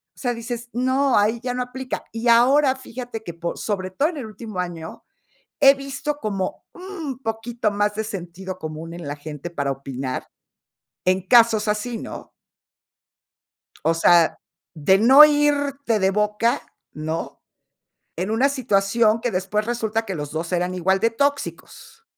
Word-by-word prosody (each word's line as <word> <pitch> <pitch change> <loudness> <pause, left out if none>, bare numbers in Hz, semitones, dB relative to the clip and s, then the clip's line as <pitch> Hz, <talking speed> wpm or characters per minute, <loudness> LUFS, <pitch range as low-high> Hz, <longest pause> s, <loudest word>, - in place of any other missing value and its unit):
o - - -19
sea, 245 -2 -1
dices: 240 +1 -6
"No, 260 +2 +2
ahí 215 +3 +2
ya 250 -1 -2
no 250 - -1
aplica". 255 +1 -6
Y 230 +2 -3
ahora 260 +4 +5
fíjate 245 -3 -8
que 170 - -7
por 170 0 -4
sobre 190 -3 -2
todo 285 - +1
en 335 - -7
el 265 - -5
último 215 -3 -8
año, 170 -3 -5 0.6
he 275 -1 +8
visto 275 +2 -4
como 200 -8 -3
un 345 -8 -7
poquito 225 -2 -2
más 205 0 0
de 220 - -1
sentido 185 -1 -7
común 160 +1 -7
en 170 -3 -8
la 145 - -3
gente 150 +2 -7
para 140 -4 -2
opinar, 135 -1 -5 0.8
en 185 0 +2
casos 225 -1 +5
así, 215 +2 -1
¿no? - - -8 1.5
O 165 - +4
sea 165 0 +4 0.4
de 170 +5 +3
no 265 +7 +9
irte 285 -5 +2
de 190 0 +2
boca, 210 +5 +1 0.3
¿no?, 155 +2 -5 0.8
en 185 +4 -2
una 255 +6 +3
situación 225 -3 +2
que 245 - 0
después 195 +3 -1
resulta 225 -1 -1
que 195 -3 -4
los 145 -2 -5
2 165 +3 -4
eran 180 0 0
igual 190 +2 +1
de 230 +1 +2
tóxicos. 285 - -3
220 Hz, 155 wpm, -22 LUFS, 180-250 Hz, 1.5 s, no